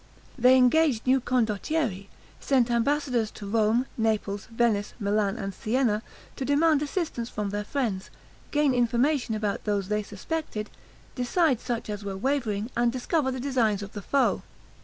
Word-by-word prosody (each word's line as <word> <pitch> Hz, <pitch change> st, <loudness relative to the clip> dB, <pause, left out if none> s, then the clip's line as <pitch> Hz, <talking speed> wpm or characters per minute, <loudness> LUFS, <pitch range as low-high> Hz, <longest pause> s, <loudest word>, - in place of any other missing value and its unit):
They 255 Hz, +1 st, +6 dB
engaged 255 Hz, -1 st, +3 dB
new 260 Hz, +1 st, +3 dB
condottieri, 230 Hz, -, 0 dB, 0.3 s
sent 250 Hz, -3 st, +2 dB
ambassadors 245 Hz, -2 st, +1 dB
to 205 Hz, -, -7 dB
Rome, 220 Hz, +4 st, +2 dB
Naples, 210 Hz, -2 st, -1 dB
Venice, 225 Hz, -3 st, 0 dB
Milan, 205 Hz, 0 st, 0 dB
and 195 Hz, -3 st, -4 dB
Sienna, 220 Hz, 0 st, 0 dB, 0.4 s
to -, -, -3 dB
demand 290 Hz, +2 st, +3 dB
assistance 295 Hz, -6 st, -2 dB
from 205 Hz, -3 st, -3 dB
their 205 Hz, 0 st, -2 dB
friends, 210 Hz, -6 st, -2 dB, 0.4 s
gain 295 Hz, -2 st, +2 dB
information 245 Hz, +1 st, +1 dB
about 210 Hz, -2 st, -2 dB
those 200 Hz, -2 st, -1 dB
they 210 Hz, 0 st, +1 dB
suspected, 215 Hz, +2 st, -5 dB, 0.4 s
decide 260 Hz, +1 st, +1 dB
such 240 Hz, -2 st, -3 dB
as 205 Hz, -1 st, -5 dB
were 195 Hz, -1 st, -4 dB
wavering, 230 Hz, -2 st, -1 dB
and 240 Hz, 0 st, +2 dB
discover 265 Hz, +3 st, 0 dB
the 260 Hz, 0 st, -3 dB
designs 235 Hz, -6 st, +1 dB
of 200 Hz, -, -8 dB
the 205 Hz, -, -6 dB
foe. 275 Hz, +7 st, +1 dB
235 Hz, 150 wpm, -27 LUFS, 210-265 Hz, 0.4 s, They